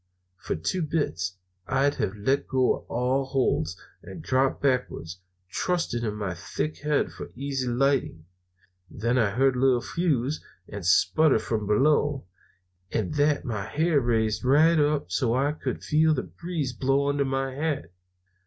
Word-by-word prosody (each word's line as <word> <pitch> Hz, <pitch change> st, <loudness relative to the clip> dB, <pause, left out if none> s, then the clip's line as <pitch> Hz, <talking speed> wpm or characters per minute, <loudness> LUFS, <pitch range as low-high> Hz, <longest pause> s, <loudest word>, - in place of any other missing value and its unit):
"For -, -, -3 dB
two 90 Hz, -, -2 dB
bits 95 Hz, -, -2 dB, 0.3 s
I'd 135 Hz, +2 st, +2 dB
have 95 Hz, -, -1 dB
let 135 Hz, +7 st, 0 dB
go 130 Hz, -1 st, +1 dB
all 125 Hz, +3 st, +1 dB
holts 130 Hz, -, 0 dB, 0.2 s
and -, -, -10 dB
dropped 130 Hz, +1 st, +1 dB
backwards, 125 Hz, -10 st, -1 dB, 0.3 s
trusting 170 Hz, -, -1 dB
to 115 Hz, -, -1 dB
my 105 Hz, -3 st, -3 dB
thick 95 Hz, -, -4 dB
head 150 Hz, -1 st, 0 dB
for -, -, -8 dB
easy 135 Hz, 0 st, -3 dB
lighting. 125 Hz, -, 0 dB, 0.6 s
Then 120 Hz, +4 st, 0 dB
I 110 Hz, -4 st, +3 dB
heard 130 Hz, +5 st, +2 dB
a -, -, -2 dB
little 130 Hz, -2 st, +4 dB
fizz 150 Hz, -2 st, -1 dB, 0.2 s
and 100 Hz, -2 st, -7 dB
sputter 95 Hz, -, +4 dB
from 110 Hz, -1 st, -2 dB
below. 145 Hz, +3 st, +2 dB, 0.7 s
At 105 Hz, +1 st, -1 dB
that 145 Hz, 0 st, +2 dB
my 105 Hz, -5 st, -3 dB
hair 155 Hz, +5 st, +1 dB
riz 110 Hz, -2 st, 0 dB
right 155 Hz, +5 st, +5 dB
up 145 Hz, -11 st, +1 dB
so 115 Hz, +5 st, +1 dB
I 140 Hz, +3 st, +2 dB
could 150 Hz, -, -5 dB
feel 155 Hz, 0 st, +3 dB
the 130 Hz, -, -2 dB
breeze 165 Hz, -7 st, -4 dB
blow 135 Hz, +2 st, +1 dB
under 145 Hz, 0 st, +1 dB
my 135 Hz, 0 st, -1 dB
hat. 145 Hz, -, -2 dB
130 Hz, 155 wpm, -26 LUFS, 110-145 Hz, 0.7 s, right